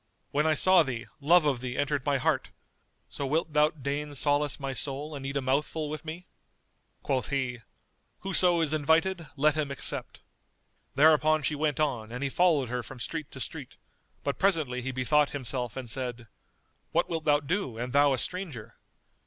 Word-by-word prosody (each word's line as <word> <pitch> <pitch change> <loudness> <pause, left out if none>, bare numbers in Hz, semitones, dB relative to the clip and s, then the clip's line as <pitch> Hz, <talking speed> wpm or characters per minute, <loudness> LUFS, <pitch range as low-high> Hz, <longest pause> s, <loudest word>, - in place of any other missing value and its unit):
When 150 +2 +2
I 155 - +3
saw 185 +3 +6
thee, 125 -6 -3
love 165 +3 +5
of 135 -5 +1
thee 125 0 -4
entered 145 -1 0
my 140 -1 +3
heart: 130 - 0 0.6
so - - -6
wilt 160 +2 -1
thou 150 0 +5
deign 145 0 -4
solace 145 +1 +1
my 135 -1 -3
soul 140 +4 -3
and 140 -2 -6
eat 140 +1 -2
a 140 - -2
mouthful 150 +3 -1
with 155 - -5
me?" 165 +3 -7 0.8
Quoth 130 -5 0
he, 130 -3 -1 0.6
"Whoso 180 -3 +3
is 155 -2 +1
invited, 165 +3 +1
let 150 +2 +3
him 150 -2 -2
accept." 140 - -1 0.7
Thereupon 155 +1 +5
she 140 - 0
went 150 0 -1
on 125 -8 -1
and 125 +3 -4
he 140 - 0
followed 160 -7 +3
her 125 0 -2
from 130 +2 -10
street 155 +5 -5
to 130 - -10
street, 120 - -7 0.5
but 140 -3 -2
presently 155 -10 +1
he 130 +2 -3
bethought 140 +3 +2
himself 125 -2 -3
and 130 -2 -5
said, 125 -1 -4 0.6
"What 170 - +2
wilt 165 -2 -3
thou 145 -1 +4
do 145 - -2
and 125 +2 -4
thou 145 0 +5
a - - 0
stranger? 125 - -5
145 Hz, 180 wpm, -28 LUFS, 130-155 Hz, 0.8 s, saw